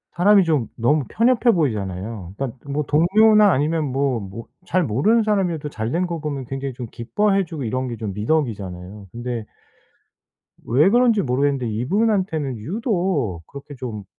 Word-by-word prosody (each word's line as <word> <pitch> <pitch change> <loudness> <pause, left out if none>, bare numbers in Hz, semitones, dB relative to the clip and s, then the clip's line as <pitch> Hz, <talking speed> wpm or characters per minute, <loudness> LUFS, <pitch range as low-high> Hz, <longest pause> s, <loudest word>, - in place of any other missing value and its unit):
사람이 195 +2 +5
좀 150 -9 +1
너무 140 +5 +2
편협해 240 +1 +3
보이잖아요. 100 - -3
그러니까 135 -2 -4
뭐 150 +2 -1
동료나 210 +7 +5
아니면 155 +2 +1
뭐 135 -2 0
뭐 100 +3 -8 0.2
잘 185 0 +1
모르는 160 - +2
사람이어도 180 -8 0
잘 110 -4 -4
된 180 +4 0
거 170 -1 -4
보면 145 -4 -4
굉장히 135 +1 -5
좀 120 -1 -7
기뻐해 195 - 0
주고 160 -4 -6
이런 130 +3 -2
게 120 - -4
좀 105 -3 -4
미덕이잖아요. 105 - -3
근데 120 -1 -5 1.2
왜 150 +11 +3
그런지 235 -3 +4
모르겠는데 135 -1 0
이분한테는 160 - 0
유독 175 - -1
그렇게 140 +1 -10
좀 115 -5 -6
140 Hz, 345 characters per minute, -21 LUFS, 115-180 Hz, 1.2 s, 사람이